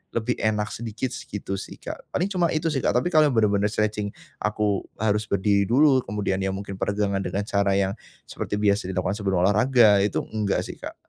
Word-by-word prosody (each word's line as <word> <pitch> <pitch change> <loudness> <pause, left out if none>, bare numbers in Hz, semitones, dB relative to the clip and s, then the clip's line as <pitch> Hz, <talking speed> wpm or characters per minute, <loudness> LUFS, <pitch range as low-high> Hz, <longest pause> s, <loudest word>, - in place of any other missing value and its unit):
lebih 115 +2 -1
enak 105 -1 0
sedikit 120 +2 -4
sih, 130 - -8
gitu 95 -1 -4
sih, - - -8
Kak. - - -9
Paling 195 +3 -2
cuma 180 -3 +2
itu 160 +1 0
sih, 140 - 0
Kak. - - 0
Tapi 125 +9 +1
kalau 155 -2 +5
yang 135 - -1
benar-benar 105 -2 +3
stretching, 105 -1 -2 0.2
aku 105 -1 0 0.2
harus 105 0 0
berdiri 100 0 +2
dulu, 135 +3 +5
kemudian 100 -2 -1
iya 95 - -1
mungkin 100 -1 -7
peregangan 100 -1 0
dengan 100 +1 -2
cara 100 -1 +1
yang 95 -1 +1 0.3
seperti - - -5
biasa 105 -2 +1
dilakukan 95 +1 0
sebelum 95 -3 +1
olahraga, 110 +1 +5
itu 100 0 0
enggak 105 -2 -1
sih, - - -9
Kak. - - -8
105 Hz, 200 wpm, -24 LUFS, 100-115 Hz, 0.3 s, kalau